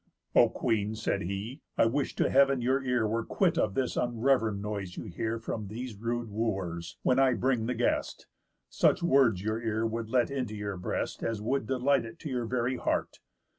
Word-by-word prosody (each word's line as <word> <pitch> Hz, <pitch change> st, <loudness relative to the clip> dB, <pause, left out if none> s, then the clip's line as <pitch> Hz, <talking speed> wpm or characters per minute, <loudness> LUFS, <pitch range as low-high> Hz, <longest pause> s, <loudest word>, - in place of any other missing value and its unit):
"O -, -, +6 dB
Queen," 110 Hz, -1 st, -1 dB
said 110 Hz, -2 st, -1 dB
he, 100 Hz, -, -4 dB, 0.2 s
"I -, -, +5 dB
wish 135 Hz, +4 st, 0 dB
to -, -, +2 dB
heav'n 140 Hz, -1 st, +4 dB
your 130 Hz, +3 st, +1 dB
ear 125 Hz, -4 st, +1 dB
Were 115 Hz, +2 st, -1 dB
quit -, -, +1 dB
of 95 Hz, -, 0 dB
this 130 Hz, -2 st, 0 dB
unrev'rend 120 Hz, -3 st, +1 dB
noise 100 Hz, -3 st, -5 dB
you -, -, -4 dB
hear 110 Hz, +6 st, -3 dB
From 110 Hz, -2 st, -4 dB
these 115 Hz, +2 st, -6 dB
rude 115 Hz, +1 st, -3 dB
Wooers, 90 Hz, -6 st, -3 dB
when 130 Hz, -, +3 dB
I 130 Hz, -2 st, +4 dB
bring 125 Hz, -3 st, +1 dB
the 125 Hz, -, -1 dB
guest; 120 Hz, -, -1 dB, 0.4 s
Such -, -, +2 dB
words 130 Hz, -, +4 dB
your 110 Hz, +2 st, -1 dB
ear 110 Hz, -1 st, -1 dB
would 115 Hz, 0 st, -3 dB
let 125 Hz, +1 st, +2 dB
into 125 Hz, -6 st, -3 dB
your 100 Hz, -1 st, -4 dB
breast 90 Hz, -, -3 dB
As 115 Hz, -2 st, -2 dB
would 115 Hz, +2 st, -1 dB
delight 135 Hz, +1 st, +2 dB
it 115 Hz, -, -10 dB
to 155 Hz, -, -5 dB
your 120 Hz, -2 st, -1 dB
very 125 Hz, +1 st, 0 dB
heart. -, -, -1 dB
115 Hz, 195 wpm, -29 LUFS, 105-130 Hz, 0.4 s, O